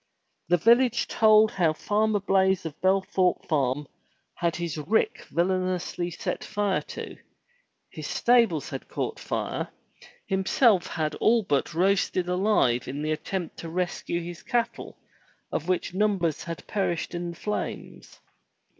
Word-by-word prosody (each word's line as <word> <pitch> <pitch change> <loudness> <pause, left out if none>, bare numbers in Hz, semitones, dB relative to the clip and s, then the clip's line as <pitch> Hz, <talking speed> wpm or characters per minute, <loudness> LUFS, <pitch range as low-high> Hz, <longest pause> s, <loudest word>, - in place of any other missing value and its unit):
The 175 +1 +4
village 235 +5 +4
told 215 0 +5
how 170 -5 +2
Farmer 210 +5 +1
Blaize 190 -2 +2
of 160 - -4
Belthorpe 190 -1 +2
Farm 140 -2 0 0.5
had 170 -1 -1
his 170 -3 -3
rick 215 - 0
villainously 180 0 -1
set 170 - -4
fire 205 -2 0
to; - - -7 0.7
his - - -7
stables 230 - +2
had - - -6
caught - - -4
fire, - - -3 0.6
himself 190 +1 +3
had 155 -2 -2
been - - -9
all 230 0 +4
but 145 -1 -1
roasted 185 0 +2
alive 180 - +2
in 140 +3 -4
the 155 - -1
attempt 170 +2 -4
to 165 - -7
rescue 175 0 -2
his 175 0 -8
cattle, 240 -1 -2 0.5
of 160 - -3
which 180 -1 -1
numbers 190 -6 0
had 165 -1 -6
perished 185 -5 -2
in 175 0 -3
the 170 - -7
flames. 210 - -5
185 Hz, 135 wpm, -26 LUFS, 165-205 Hz, 0.7 s, told